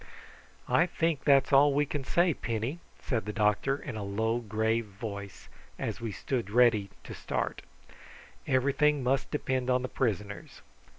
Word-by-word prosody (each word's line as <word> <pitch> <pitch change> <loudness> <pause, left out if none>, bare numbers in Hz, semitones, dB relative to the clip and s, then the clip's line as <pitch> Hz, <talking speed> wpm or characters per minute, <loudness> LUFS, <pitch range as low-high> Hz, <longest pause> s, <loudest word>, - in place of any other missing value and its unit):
"I 175 - +3
think 165 -4 -1
that's 140 -1 +4
all 140 +1 +6
we 145 +1 +3
can 145 -1 -4
say, 170 +4 +2
Penny," 115 +6 -3 0.2
said 115 -6 -2
the 105 - -3
doctor 105 +6 +1
in 130 -4 -7
a 110 - -4
low 110 +4 0
grave 110 +1 0
voice, 100 -2 -8 0.3
as - - -4
we 115 -2 -3
stood 115 +2 -3
ready 110 -3 +4
to - - -8
start. - - -3 0.9
"Everything 140 +2 +2
must 130 +1 0
depend 130 -3 -1
on 125 0 +2
the - - -1
prisoners. 105 -5 -3
125 Hz, 155 wpm, -29 LUFS, 110-140 Hz, 0.9 s, all